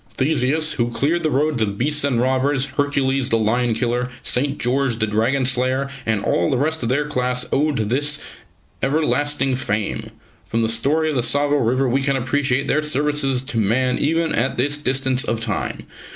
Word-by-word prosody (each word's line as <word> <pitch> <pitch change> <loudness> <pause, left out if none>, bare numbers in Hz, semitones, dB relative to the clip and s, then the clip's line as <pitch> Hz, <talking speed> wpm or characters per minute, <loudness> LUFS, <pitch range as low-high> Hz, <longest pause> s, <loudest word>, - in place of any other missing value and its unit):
Theseus, 150 +2 +1
who 120 -1 0
cleared 150 +8 0
the 155 - +1
roads 145 -2 +1
of 100 -2 -1
beasts 150 +5 +1
and 135 -5 +1
robbers; 130 +2 +1
Hercules, 135 -2 +1
the 115 - +3
lion 115 +2 +1
killer; 120 +1 -1 0.2
St. 140 +3 -1
George, 125 -1 0
the 110 - +1
dragon 115 +6 +1
slayer, 130 +2 0 0.2
and 110 -2 0
all - - +1
the 135 - +1
rest 160 +4 0
of 115 - -2
their 145 +4 +1
class 125 -3 -1
owed 150 0 +1
to 110 - 0
this 145 +6 0 0.6
their 135 - 0
everlasting 145 -3 +1
fame. 105 -4 -2 0.4
From 115 0 0
the 110 - 0
story 145 +8 +1
of - - -3
the 125 - +2
Tsavo 145 +3 +2
River 130 +1 +1
we 130 +3 +1
can 140 0 +1
appreciate 135 +1 0
their 155 - +2
services 145 -3 +1
to 130 -4 -3
man 125 +5 +1
even 165 +2 +1
at 125 +3 0
this 145 +4 0
distance 130 -1 0
of 115 -6 -1
time. 110 -3 -3
135 Hz, 190 wpm, -20 LUFS, 120-145 Hz, 0.6 s, the